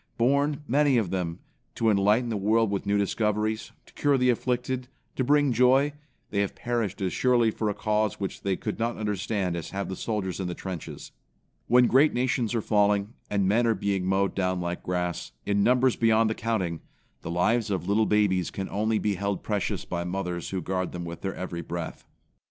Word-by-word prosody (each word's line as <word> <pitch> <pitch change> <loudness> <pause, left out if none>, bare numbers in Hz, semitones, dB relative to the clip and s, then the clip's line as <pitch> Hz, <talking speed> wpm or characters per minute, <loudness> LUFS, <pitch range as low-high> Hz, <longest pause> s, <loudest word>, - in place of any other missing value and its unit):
Born, 140 +4 +2
many 140 0 +3
of 105 -7 0
them, 90 -3 -3 0.3
to 115 -1 +2
enlighten 105 +4 +3
the 110 - -1
world 110 +2 +2
with 100 -1 -2
new 100 0 +2
discoveries, 105 +2 0
to - - -20
cure 145 -2 +2
the 125 -1 +4
afflicted, 125 +1 -2 0.3
to 130 - 0
bring 145 0 +3
joy, 130 +4 +4 0.4
they 100 - 0
have 100 -1 -1
perished 115 -5 -2
as 95 -2 -1
surely 120 -3 +3
or 110 - +2
a 105 - -2
cause 105 -1 0
which 100 -2 -4
they 100 -1 0
could 105 +1 -5
not 115 +1 -1
understand 105 -3 -1
as 85 -3 -5
have 100 0 -4
the 95 - -3
soldiers 100 -5 -3
in 95 - -2
the 90 - -4
trenches. 95 -4 -7 0.6
When 125 +1 +6
great 135 +4 +4
nations 125 -2 0
are 115 - +1
falling, 105 0 +2 0.2
and 100 -2 +1
men 115 +4 +3
are 115 - +3
being 100 -1 -1
mowed 95 +1 +1
down 95 -1 0
like 85 0 -3
grass, 90 -6 -3
in 100 0 +1
numbers 125 +3 +3
beyond 115 -1 +3
the - - +1
counting, 100 -8 -2 0.4
the - - -6
lives 105 +7 +1
of 95 -3 -2
little 105 +2 +3
babies 95 -4 +2
can 95 -1 -5
only 110 +2 0
be 105 -1 0
held 100 +1 -2
precious 105 -3 -2
by 85 -1 -3
mothers 90 -1 -3
who 95 -3 -3
guard 95 0 -2
them 85 -1 -5
with 85 0 -7
their 95 - -3
every 90 -2 -5
breath. 85 0 -6
105 Hz, 200 wpm, -27 LUFS, 95-115 Hz, 0.6 s, When